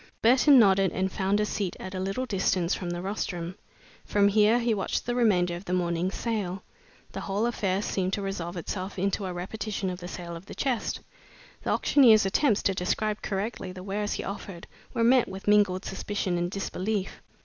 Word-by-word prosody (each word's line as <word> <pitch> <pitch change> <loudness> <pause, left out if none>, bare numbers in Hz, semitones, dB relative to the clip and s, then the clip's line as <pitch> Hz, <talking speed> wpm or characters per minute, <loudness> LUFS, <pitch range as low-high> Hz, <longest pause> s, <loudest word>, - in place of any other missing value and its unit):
Burton 260 +4 +6
nodded 195 -4 +5
and 190 0 -1
found 195 +2 0
a 210 - +2
seat 200 -3 -2
at 185 - -7
a 185 - -3
little 195 +7 -2
distance 185 -5 +1
from 180 - -3
the 175 0 -4
rostrum. 180 -3 -3 0.5
From 200 -1 +3
here 215 +3 +4
he 235 -1 +1
watched 195 -3 -2
the 240 - -1
remainder 185 -8 +2
of 175 +3 -9
the 180 - -3
morning's 175 +1 -1
sale. 200 -5 -3 0.5
The - - -5
whole 205 +3 -1
affair 200 -4 0
seemed 185 -2 -1
to 205 - -1
resolve 180 -3 -4
itself 185 +3 -5
into 195 +1 -1
a - - -3
repetition 195 +2 -3
of 180 - -6
the 175 - -7
sale 175 -1 -7
of 170 +4 -11
the - - -9
chest. 260 -5 -1 0.6
The - - -4
auctioneer's 225 -7 +5
attempts 215 +2 +2
to 195 - +2
describe 210 +4 -1
correctly 195 -1 -3
the 185 0 -9
wares 205 +2 -2
he - - -3
offered 195 -3 -7 0.3
were 230 - 0
met 245 +1 +5
with 190 +1 -8
mingled 205 -3 +3
suspicion 195 -1 -2
and 175 0 -1
disbelief. 195 +1 -3
195 Hz, 195 wpm, -27 LUFS, 185-210 Hz, 0.6 s, Burton